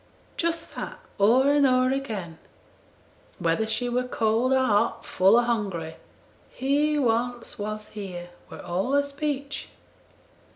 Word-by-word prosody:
Just 335 Hz, -1 st, -2 dB
that -, -, -5 dB, 0.2 s
o'er 250 Hz, +7 st, +5 dB
and 290 Hz, -1 st, +5 dB
o'er 255 Hz, 0 st, +3 dB
again, 210 Hz, -12 st, -4 dB, 1.0 s
whether 165 Hz, +6 st, 0 dB
she 220 Hz, +3 st, 0 dB
were 250 Hz, +1 st, -1 dB
cold 230 Hz, +2 st, +1 dB
or 265 Hz, -, +5 dB
hot, 225 Hz, -4 st, +1 dB
full 190 Hz, +4 st, +4 dB
or 240 Hz, -, +5 dB
hungry, 195 Hz, -9 st, -2 dB, 0.5 s
"He 290 Hz, +3 st, +1 dB
once 240 Hz, -3 st, -1 dB
was 215 Hz, +1 st, -5 dB
here," 180 Hz, -4 st, -7 dB, 0.2 s
were -, -, -9 dB
all 185 Hz, +9 st, -1 dB
her 285 Hz, 0 st, +4 dB
speech. 285 Hz, 0 st, -4 dB
240 Hz, 130 wpm, -26 LUFS, 205-270 Hz, 1.0 s, o'er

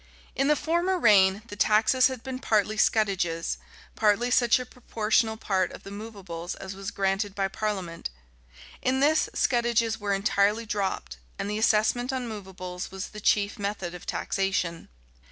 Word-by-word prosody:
In 275 Hz, -, +1 dB
the 300 Hz, -, +4 dB
former 345 Hz, +5 st, 0 dB
reign, 200 Hz, -, +5 dB
the 205 Hz, -, -7 dB
taxes 220 Hz, +5 st, +4 dB
had 260 Hz, -3 st, -6 dB
been 260 Hz, -1 st, -5 dB
partly 215 Hz, -3 st, +1 dB
scutages, 190 Hz, -7 st, +1 dB, 0.4 s
partly 220 Hz, +3 st, +2 dB
such 240 Hz, -2 st, +4 dB
a 250 Hz, -, -5 dB
proportional 225 Hz, -2 st, 0 dB
part 190 Hz, -4 st, 0 dB
of -, -, -11 dB
the 195 Hz, -, -9 dB
movables 200 Hz, -5 st, -7 dB
as 190 Hz, 0 st, -7 dB
was 195 Hz, 0 st, -5 dB
granted 195 Hz, +1 st, -1 dB
by 195 Hz, -1 st, 0 dB
parliament; 190 Hz, -, -3 dB, 0.7 s
in 260 Hz, +1 st, +1 dB
this, 305 Hz, +3 st, +3 dB
scutages 235 Hz, -2 st, +1 dB
were 200 Hz, -1 st, 0 dB
entirely 205 Hz, +2 st, +1 dB
dropped, 190 Hz, -, -3 dB, 0.2 s
and 205 Hz, -, -3 dB
the 210 Hz, -, -2 dB
assessment 225 Hz, +4 st, +2 dB
on 255 Hz, -2 st, -3 dB
movables 185 Hz, -4 st, -7 dB
was 190 Hz, 0 st, -6 dB
the 210 Hz, -, -9 dB
chief 205 Hz, +2 st, +2 dB
method 200 Hz, -3 st, -3 dB
of 180 Hz, -, -10 dB
taxation. 190 Hz, -4 st, -1 dB
210 Hz, 155 wpm, -27 LUFS, 195-230 Hz, 0.7 s, reign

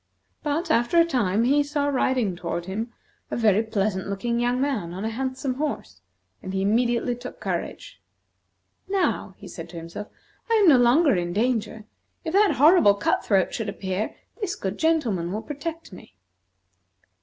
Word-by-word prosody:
But, 315 Hz, +3 st, -1 dB
after 240 Hz, +8 st, +3 dB
a 335 Hz, -, +6 dB
time, 230 Hz, -, +1 dB
he 280 Hz, +4 st, +4 dB
saw 290 Hz, 0 st, -1 dB
riding 255 Hz, -7 st, +1 dB
toward 170 Hz, 0 st, -4 dB
him 220 Hz, +5 st, -4 dB, 0.4 s
a -, -, -3 dB
very 215 Hz, -3 st, +4 dB
pleasant 205 Hz, -4 st, -1 dB
looking 235 Hz, +4 st, -2 dB
young 245 Hz, +1 st, +1 dB
man 225 Hz, -12 st, -1 dB
on 195 Hz, +3 st, -4 dB
a 225 Hz, -, -1 dB
handsome 260 Hz, +2 st, -2 dB
horse, 250 Hz, -, -4 dB, 0.4 s
and 185 Hz, -, -6 dB
he 190 Hz, -, 0 dB
immediately 240 Hz, +3 st, +1 dB
took 245 Hz, +1 st, -9 dB
courage. -, -, -5 dB, 0.9 s
"Now," 385 Hz, -1 st, 0 dB
said -, -, -8 dB
he -, -, -15 dB
to -, -, -7 dB
himself, 170 Hz, +5 st, -7 dB, 0.4 s
"I 455 Hz, -, +3 dB
am 420 Hz, -4 st, +5 dB
no 275 Hz, -6 st, +7 dB
longer 255 Hz, +3 st, +4 dB
in 175 Hz, -1 st, -2 dB
danger. 220 Hz, -1 st, -1 dB, 0.4 s
If 320 Hz, -, -3 dB
that 405 Hz, 0 st, +4 dB
horrible 295 Hz, -, +6 dB
cut -, -, 0 dB
throat 195 Hz, -3 st, +2 dB
should 220 Hz, -3 st, -3 dB
appear, 195 Hz, +1 st, -3 dB, 0.3 s
this 390 Hz, -3 st, -2 dB
good 195 Hz, +1 st, -4 dB
gentleman 245 Hz, -, +1 dB
will 215 Hz, +3 st, -3 dB
protect 320 Hz, -, -6 dB
me." 180 Hz, -, -13 dB
235 Hz, 165 wpm, -24 LUFS, 200-285 Hz, 0.9 s, no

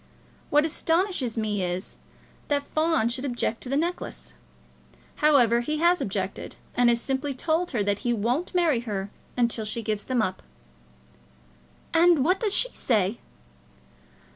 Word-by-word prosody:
What 295 Hz, +1 st, +4 dB
astonishes 325 Hz, -, 0 dB
me 210 Hz, -3 st, -1 dB
is, 180 Hz, +1 st, -4 dB, 0.5 s
that 285 Hz, -1 st, 0 dB
Fawn 315 Hz, -5 st, +1 dB
should 245 Hz, +2 st, -1 dB
object 240 Hz, -4 st, -2 dB
to 250 Hz, -, -6 dB
the 275 Hz, -, +1 dB
necklace. 340 Hz, +4 st, -3 dB, 0.8 s
However, 255 Hz, -6 st, +4 dB
he 300 Hz, +6 st, -2 dB
has 345 Hz, +3 st, +3 dB
objected, -, -, -4 dB, 0.2 s
and 245 Hz, -1 st, +4 dB
has 235 Hz, 0 st, +3 dB
simply 270 Hz, +2 st, -2 dB
told 330 Hz, +6 st, 0 dB
her 215 Hz, -5 st, 0 dB
that 200 Hz, 0 st, 0 dB
he 240 Hz, -, -1 dB
won't 240 Hz, -, -1 dB
marry 330 Hz, -8 st, +3 dB
her 205 Hz, -4 st, -4 dB, 0.3 s
unless 235 Hz, -3 st, 0 dB
she 225 Hz, +2 st, -2 dB
gives 215 Hz, -1 st, -2 dB
them 250 Hz, -4 st, +1 dB
up." 185 Hz, -1 st, -3 dB, 1.5 s
"And 335 Hz, -4 st, +5 dB
what 365 Hz, +3 st, +2 dB
does 420 Hz, -3 st, +1 dB
she -, -, +4 dB
say?" 210 Hz, -2 st, 0 dB
255 Hz, 145 wpm, -26 LUFS, 225-320 Hz, 1.5 s, And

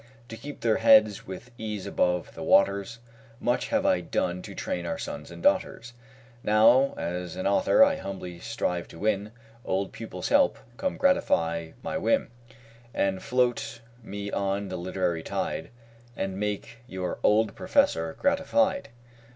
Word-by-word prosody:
To 115 Hz, -, -6 dB
keep 145 Hz, +5 st, -9 dB
their 110 Hz, -2 st, +2 dB
heads 110 Hz, -2 st, +5 dB
with 95 Hz, +7 st, -8 dB
ease 105 Hz, -3 st, -4 dB
above 90 Hz, -1 st, 0 dB
the -, -, -9 dB
waters, 100 Hz, +6 st, +3 dB, 0.4 s
Much 120 Hz, -1 st, 0 dB
have -, -, 0 dB
I -, -, +3 dB
done 90 Hz, +1 st, -1 dB
to -, -, -9 dB
train 90 Hz, -, -3 dB
our 85 Hz, -, -3 dB
sons 75 Hz, 0 st, -6 dB
and 85 Hz, 0 st, -10 dB
daughters. 120 Hz, +1 st, +1 dB, 0.5 s
Now, 120 Hz, +6 st, +5 dB
as 90 Hz, 0 st, -4 dB
an 95 Hz, -, -4 dB
author, 100 Hz, -, +5 dB
I 280 Hz, 0 st, +3 dB
humbly 90 Hz, -3 st, -7 dB
strive 90 Hz, -5 st, -2 dB
to -, -, -13 dB
win 105 Hz, +2 st, 0 dB, 0.3 s
Old 95 Hz, +1 st, -1 dB
pupils' -, -, -6 dB
help. -, -, +4 dB, 0.2 s
Come, 280 Hz, -, -2 dB
gratify 85 Hz, -, +1 dB
my 185 Hz, -, -2 dB
whim, 280 Hz, +8 st, +1 dB, 0.6 s
And 95 Hz, -1 st, 0 dB
float 125 Hz, -3 st, 0 dB, 0.2 s
me 100 Hz, -2 st, -6 dB
on 100 Hz, 0 st, -1 dB
the 95 Hz, -, -4 dB
literary 90 Hz, -2 st, -1 dB
tide 80 Hz, -, -3 dB, 0.5 s
And 95 Hz, 0 st, -3 dB
make 105 Hz, +2 st, -3 dB
your 95 Hz, -1 st, -4 dB
OLD 105 Hz, 0 st, +3 dB
PROFESSOR 80 Hz, 0 st, +1 dB
gratified. 190 Hz, -, +1 dB
100 Hz, 150 wpm, -27 LUFS, 90-115 Hz, 0.6 s, heads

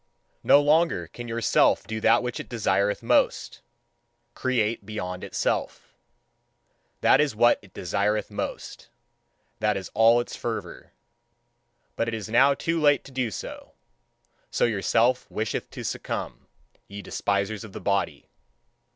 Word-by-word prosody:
No 140 Hz, -, +6 dB
longer 160 Hz, +3 st, +2 dB
can 120 Hz, 0 st, -9 dB
your 115 Hz, 0 st, -3 dB
Self -, -, +3 dB
do 110 Hz, 0 st, -5 dB
that 115 Hz, +2 st, +4 dB
which 125 Hz, 0 st, -4 dB
it -, -, -8 dB
desireth 105 Hz, -3 st, 0 dB
most: -, -, +1 dB, 0.7 s
create 115 Hz, -4 st, -1 dB
beyond 90 Hz, -3 st, -5 dB
itself. -, -, -3 dB, 1.1 s
That -, -, +5 dB
is 145 Hz, -6 st, 0 dB
what 120 Hz, +2 st, +4 dB
it 100 Hz, -4 st, -20 dB
desireth 100 Hz, +4 st, -1 dB
most; 100 Hz, -, -6 dB, 0.7 s
that 105 Hz, -2 st, +1 dB
is 95 Hz, -, -7 dB
all 115 Hz, +2 st, +5 dB
its 120 Hz, -, -4 dB
fervour. -, -, -6 dB, 1.0 s
But 115 Hz, -, -1 dB
it 115 Hz, -, -2 dB
is 110 Hz, -1 st, -6 dB
now 135 Hz, +5 st, +5 dB
too 165 Hz, +3 st, -1 dB
late 145 Hz, -1 st, +4 dB
to 140 Hz, -, -13 dB
do 130 Hz, -3 st, -1 dB
so: 100 Hz, -, -8 dB, 0.8 s
so -, -, +1 dB
your 110 Hz, -5 st, -1 dB
Self 120 Hz, +5 st, +2 dB
wisheth 110 Hz, 0 st, -3 dB
to -, -, -8 dB
succumb, -, -, -5 dB, 0.4 s
ye 100 Hz, 0 st, -9 dB
despisers 100 Hz, +2 st, -2 dB
of 110 Hz, -, -10 dB
the -, -, -8 dB
body. 100 Hz, -1 st, -1 dB
110 Hz, 140 wpm, -25 LUFS, 100-125 Hz, 1.1 s, No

